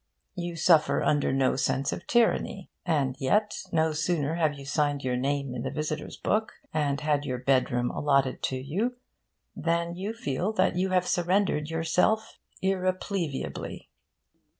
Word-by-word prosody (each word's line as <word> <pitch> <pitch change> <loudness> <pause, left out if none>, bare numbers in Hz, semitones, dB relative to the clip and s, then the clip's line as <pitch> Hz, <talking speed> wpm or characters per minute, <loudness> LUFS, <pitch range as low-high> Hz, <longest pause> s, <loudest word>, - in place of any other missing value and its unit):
You 175 -2 -4
suffer 165 -1 +4
under 145 -3 +2
no 135 -1 +2
sense 135 +1 0
of - - -7
tyranny. 225 -5 +1 0.2
And 140 -6 +1
yet, 210 +10 +2 0.2
no 160 -1 +2
sooner 155 -1 0
have 155 -3 +1
you 140 - -9
signed 145 0 0
your 125 -1 0
name 140 +1 -1
in 125 - -4
the 130 - -2
visitors' 150 +2 -4
book, 220 +1 0 0.2
and 145 -3 0
had 150 -1 +1
your 130 -3 -2
bedroom 125 -1 +1
allotted 140 -3 +1
to 130 - -2
you, 190 - -2 0.6
than 170 0 0
you 195 +5 -3
feel 180 - -2
that 185 -3 +2
you 185 +2 +1
have 180 -1 +2
surrendered 175 -4 +1
yourself 165 +7 +1 0.2
irrepleviably. 185 -4 -2
155 Hz, 150 wpm, -28 LUFS, 140-185 Hz, 0.6 s, suffer